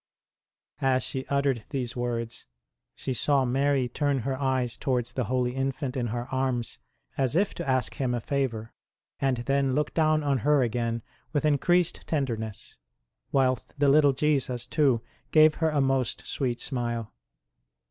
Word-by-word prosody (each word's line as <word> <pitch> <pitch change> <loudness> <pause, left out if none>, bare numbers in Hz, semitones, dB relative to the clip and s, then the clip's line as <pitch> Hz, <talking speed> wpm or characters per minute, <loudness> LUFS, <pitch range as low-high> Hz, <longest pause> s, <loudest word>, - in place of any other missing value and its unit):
As 130 -1 +2
she 130 0 -3
uttered 140 -5 +1
these 125 -4 -3
words, 120 -1 -3 0.5
she 130 - -3
saw 135 +2 +2
Mary 135 +1 +2
turn 140 +2 0
her 135 +2 -2
eyes 130 -3 0
towards 120 -3 -1
the 125 - -1
Holy 125 +1 0
Infant 135 0 -2
in 125 -2 -1
her 120 +2 -3
arms 130 -3 -1 0.4
as 135 +1 +1
if 195 +3 +2
to 170 -5 -5
ask 130 -3 +1
Him 125 -3 -1
a - - -1
favour, 115 -4 -2 0.5
and 135 -2 +1
then 135 -1 +1
look 150 0 0
down 155 -1 +2
on 140 -2 +1
her 145 +1 +3
again 115 -1 -1 0.3
with 145 0 +1
increased 175 +4 +2
tenderness; 115 -8 -3 0.5
whilst 130 -2 +1
the 145 -1 +4
little 145 0 +5
Jesus 135 -4 0
too 140 -7 +2 0.3
gave 155 0 +6
her 160 - +4
a 150 -2 +1
most 135 -2 0
sweet 125 -4 -2
smile. 120 -4 -3
130 Hz, 155 wpm, -27 LUFS, 120-140 Hz, 0.5 s, gave